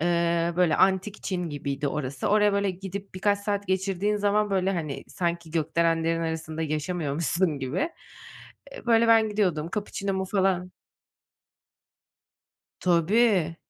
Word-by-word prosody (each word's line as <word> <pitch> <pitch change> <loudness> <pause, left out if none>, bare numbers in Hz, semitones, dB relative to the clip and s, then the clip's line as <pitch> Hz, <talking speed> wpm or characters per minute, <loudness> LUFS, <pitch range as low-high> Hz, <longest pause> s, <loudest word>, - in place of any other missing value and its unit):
eee, 170 0 +1
böyle, 175 -3 +3
antik 190 +1 +1
Çin 180 -3 -2
gibiydi 140 0 -3
orası. 140 -2 -3
Oraya, 210 -1 +4
böyle, 200 -1 +1
gidip 195 +1 -7
birkaç 200 +2 +1
saat 200 0 -2
geçirdiğin 195 +2 0
zaman, 205 0 +1
böyle, 190 0 +1
hani, 155 -6 -4
sanki 170 -2 -3
gökdelenlerin 165 +1 +1
arasında 160 -1 -3
yaşamıyormuşsun 155 +1 -1
gibi. 145 - -2 0.8
Eee, - - -11
böyle, 230 0 +4
ben 225 -1 +5
gidiyordum, 180 -7 0
kapuçinomu 195 -2 -2
falan 190 -2 0 2.1
Tabii. 180 0 +3
180 Hz, 120 wpm, -26 LUFS, 165-200 Hz, 2.1 s, ben